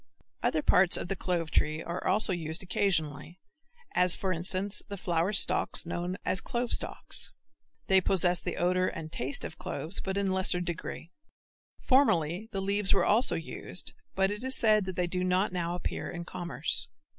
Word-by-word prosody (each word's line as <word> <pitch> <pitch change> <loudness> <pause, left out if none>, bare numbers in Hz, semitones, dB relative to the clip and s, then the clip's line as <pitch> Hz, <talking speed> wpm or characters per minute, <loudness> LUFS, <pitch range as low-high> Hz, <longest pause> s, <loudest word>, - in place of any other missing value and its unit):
Other 155 - 0
parts 180 -1 +5
of - - -6
the 195 - -1
clove 170 -3 -3
tree 155 +1 0
are 170 +1 -5
also 200 0 +3
used 160 0 -2
occasionally, 170 -3 -1 0.5
as 180 0 +4
for 190 -1 -2
instance 185 +4 +3
the 200 -1 -7
flower 175 +1 -1
stalks 200 - +3
known 175 +2 -4
as 185 - 0
clove 245 -2 -2
stalks. - - -3 0.5
They 190 -1 +4
possess 180 -1 +2
the - - -5
odor 185 +1 +1
and 160 -1 -6
taste 135 -3 -2
of 160 - -9
cloves 180 0 -4
but 190 0 -3
in 200 -1 0
a - - 0
lesser 190 -1 +2
degree. 170 -1 -6 0.7
Formerly 200 - +2
the 195 - -3
leaves 200 0 +2
were - - +2
also 225 +5 +3
used 165 - -3 0.2
but 195 +1 +1
it 210 +3 -5
is 260 0 +3
said 215 -3 +4
that 185 -1 -5
they 180 - 0
do 180 +1 -2
not 185 +2 0
now 175 -1 -2
appear 180 - -5
in 175 -1 -7
commerce. 175 -1 +1
180 Hz, 180 wpm, -29 LUFS, 170-195 Hz, 0.7 s, parts